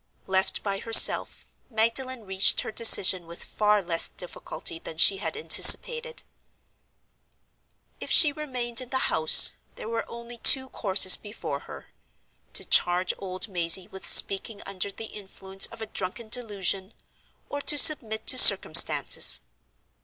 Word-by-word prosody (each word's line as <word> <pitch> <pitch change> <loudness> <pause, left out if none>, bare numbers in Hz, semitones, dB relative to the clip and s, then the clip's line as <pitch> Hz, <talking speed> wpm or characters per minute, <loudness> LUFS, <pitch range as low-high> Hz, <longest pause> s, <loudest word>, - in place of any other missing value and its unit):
Left 190 0 -4
by 195 -1 -6
herself, 225 +1 +2 0.2
Magdalen 230 +1 -3
reached 190 0 +2
her - - -10
decision 190 -5 +3
with 170 +1 -10
far 210 -1 -3
less 170 -1 -1
difficulty 170 -2 -7
than 160 - -13
she 195 +4 +3
had 210 - -7
anticipated. 475 +1 +3 1.8
If - - -9
she 300 - +2
remained 250 -5 -4
in 255 - -11
the 260 0 -4
house, 160 0 +4 0.2
there - - -12
were 230 0 -8
only 235 0 -13
two 265 +2 +3
courses 190 -5 +2
before 205 -9 -10
her—to - - -13
charge 180 +1 -1
old 185 +1 -5
Mazey 175 -1 +1
with 190 - -8
speaking 200 +2 +1
under 195 0 -7
the 225 - -11
influence 195 -2 -5
of 225 - -13
a - - -7
drunken 215 +2 -9
delusion, 200 -4 -4 0.5
or 285 - -9
to 295 - +1
submit 230 -9 +2
to 255 - +4
circumstances. - - +4
210 Hz, 135 wpm, -22 LUFS, 190-240 Hz, 1.8 s, house